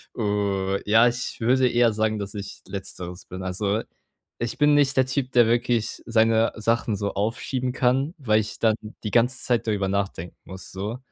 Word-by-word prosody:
Äh 100 -2 -1
ja, 115 +3 +6
ich 120 +1 -3
würde 130 +2 +3
eher 120 -1 +3
sagen, 110 0 0
dass 100 0 -5
ich 100 -2 -7
letzteres 90 -2 -6
bin. 95 +1 -8
Also, 100 +3 -1 0.6
ich 120 -1 -3
bin 150 -1 +4
nicht 145 -1 +3
der 130 - +5
Typ, 130 0 -1
der 120 -3 +5
wirklich 120 -1 0
seine 115 -1 +3
Sachen 115 0 0
so 100 0 -3
aufschieben 120 +5 -2
kann, 135 +5 +1
weil 110 -7 +2
ich 110 - -5
dann 110 -2 +3 0.3
die 105 - -3
ganze 120 +3 +3
Zeit 120 -2 +1
darüber 100 -3 0
nachdenken 95 -3 -3
muss, 95 0 -8
so. 105 +5 -4
110 Hz, 180 wpm, -24 LUFS, 100-120 Hz, 0.6 s, ja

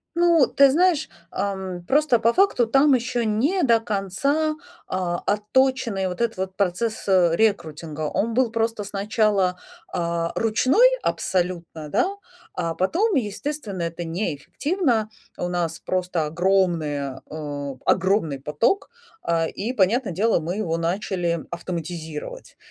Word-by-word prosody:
Ну, 340 -4 +5
ты 275 0 +5
знаешь, 335 -1 +3 0.2
ам, 190 -2 -4
просто 280 -3 +3
по 230 +1 +3
факту 370 -11 +3
там 270 +4 +4
ещё 245 -1 0
не 260 - +1
до 230 -4 +4
конца, 225 - -1 0.3
а, 180 -2 -2
отточенный 210 -1 +1
вот 180 - -6
этот 230 -3 0
вот 190 0 -4
процесс, 205 +4 -1
э, 185 -3 +4
рекрутинга. 165 -7 -1
Он 200 +9 -1
был 245 -1 +2
просто 225 -1 -1
сначала, 200 -2 +1 0.3
а, 170 -1 -1
ручной 255 - +4
абсолютно, 175 -4 -2
да? 355 - +2 0.4
А 165 -2 -2
потом, 360 - +1
естественно, 215 - -3
это 170 +1 -4
неэффективно. 215 - -1 0.3
У 175 - -2
нас 170 -2 -2
просто 180 -3 -1
огромная, 160 -5 0
э, 145 -2 -5
огромный 175 -7 +2
поток, 150 - 0 0.4
э, 165 -1 +1
и 225 +5 -4
понятно 220 +1 +2
дело, 205 +3 +2
мы 170 +4 -3
его 170 -6 -1
начали 170 -1 -1
автоматизировать. 170 - -6
195 Hz, 125 wpm, -23 LUFS, 170-235 Hz, 0.4 s, Ну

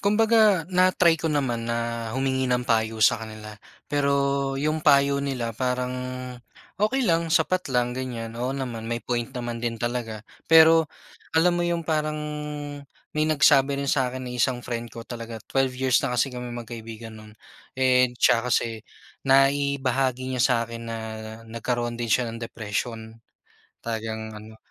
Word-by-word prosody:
Kumbaga 210 -3 +4
na-try 185 -1 +4
ko 160 - 0
naman 120 -6 -1
na 115 -1 -2
humingi 130 -1 0
ng 125 0 +1
payo 110 -1 +2
sa 115 - +4
kanila. 110 -1 -8 0.3
Pero 140 -1 +1 0.4
yung 155 +2 0
payo 140 -1 +4
nila 125 -5 -2
parang 125 +1 -1 0.9
okey 255 +5 +2
lang, 165 -4 +2
sapat 185 +2 +1
lang, 125 -2 +1
ganyan. 120 -3 -5
Oo 120 +2 -3
naman, 115 -4 -5
may 120 0 -3
point 120 0 -1
naman 120 -3 -5
din 120 -1 -2
talaga. 115 -2 -3 0.2
Pero 160 -1 +7 0.5
alam 175 +2 +5
mo - - +2
yung 170 -1 -1
parang 155 -1 0 1.0
may 155 0 +1
nagsabi 140 -2 +4
rin 140 - -3
sa'kin 130 -1 -1
na 125 - -6
isang 125 0 0
friend 120 -1 -4
ko 115 0 -9
talaga, 115 -1 -7
12 135 -1 0
years 130 -1 +3
na 125 -3 -2
kasi 130 +3 +1
kaming 125 -1 -6
magkaibigan 115 -1 -8
no'n 110 0 -13 0.4
and 125 -1 +3
'tsaka 120 +1 +3
kasi 115 -2 0 0.5
naibahagi 135 -2 +2
niya 125 - -1
sa 125 - +4
akin 115 0 -8
na 115 - -3 0.5
nagkaroon 120 +1 -2
din 120 - -2
siya 125 +3 +3
ng 115 - -8
depression. 110 0 -5 0.6
Talagang 110 -1 -4
ano 110 +1 -13
125 Hz, 155 wpm, -25 LUFS, 115-140 Hz, 1.0 s, Pero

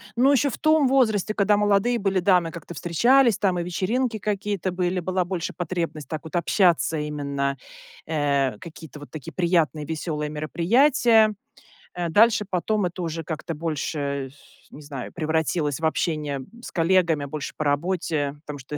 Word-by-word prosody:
ну, 255 +4 +4
еще 285 +1 +3
в - - -6
том 310 -2 +3
возрасте, 220 -6 +2
когда 205 0 +3
молодые 210 +4 +2
были, 195 -1 +1
да, 180 0 +4
мы 165 -1 -5
как-то 170 +1 -9
встречались, 235 - +3
там 185 -3 +1
и - - -1
вечеринки 220 +7 -1
какие-то 200 -2 -2
были, 180 0 -1
была 185 +1 -1
больше 175 -2 -4
потребность 170 -3 -4
так 155 -2 -5
вот 160 +2 -8
общаться- 175 -2 +2
именно, 140 -2 -2 0.5
э, 140 -6 0
какие-то 160 -3 -11
вот 145 - -12
такие 150 -5 -8
приятные, 165 -5 +1
веселые 150 -1 -3
мероприятия. 220 - +3 0.6
Э, 175 -1 -3
дальше 215 +4 +4
потом 200 +2 0
это 180 +1 -4
уже 165 -1 -3
как-то 160 +1 -5
больше, 145 -3 -3
сю 145 - -20
не 150 - -11
знаю, 140 -4 -7
превратилось 160 -2 -1
в 160 - -2
общение 155 -3 -1 0.2
с - - -9
коллегами, 165 -3 +2
больше 145 +1 -6
по - - -1
работе, 150 -1 -1
потому 145 -1 -7
что 135 +3 -7
170 Hz, 165 wpm, -24 LUFS, 150-200 Hz, 0.6 s, ну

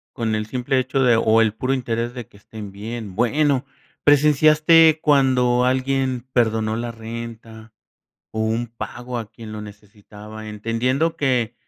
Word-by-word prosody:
Con 110 -2 -1
el 110 0 -2
simple 125 +3 -1
hecho 130 +1 -1
de, 125 -3 +4
o 115 0 +3
el 110 -2 +2
puro 130 +4 -1
interés 120 -2 -2
de 120 -3 -8
que 100 - -20
estén 105 -1 -10
bien. 105 -1 -7
Bueno, 140 +4 +1 0.4
¿presenciaste 155 +2 +5
cuando 130 -4 +3
alguien 130 -1 0
perdonó 110 -2 +1
la 120 +1 -4
renta 115 -1 -9 0.6
o 110 - -4
un 110 +2 -1
pago 120 +1 -7
a 110 -3 -7
quien 110 -1 -10
lo 110 - -6
necesitaba?, 105 +1 -12
entendiendo 120 +9 -1
que 125 -5 0
115 Hz, 150 wpm, -21 LUFS, 110-130 Hz, 0.6 s, presenciaste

